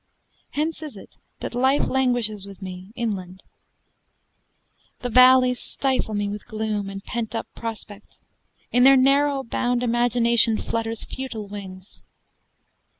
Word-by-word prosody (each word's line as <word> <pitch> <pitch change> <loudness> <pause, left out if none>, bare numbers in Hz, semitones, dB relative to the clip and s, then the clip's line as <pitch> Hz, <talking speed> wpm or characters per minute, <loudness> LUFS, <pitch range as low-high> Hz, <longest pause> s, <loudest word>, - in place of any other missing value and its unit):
Hence 310 +2 -2
is 295 -9 -8
it - - -14 0.2
that - - -5
life 265 +3 +2
languishes 245 -6 0
with 195 -2 -11
me 185 0 -8
Inland; 190 -6 -4 1.6
the 245 - -3
valleys 255 0 +6
stifle 260 -5 -1
me 205 0 -1
with 205 0 -6
gloom 215 -2 -3
And 195 0 -8
pent 230 -1 -4
up 225 - -2
prospect; 220 -2 -8 0.5
in 245 +1 +4
their 270 +1 +8
narrow 275 +1 +3
bound 245 0 -1
Imagination 235 -1 +3
flutters 225 0 -3
futile 235 -6 -6
wings. 195 -1 -10
230 Hz, 125 wpm, -23 LUFS, 205-255 Hz, 1.6 s, their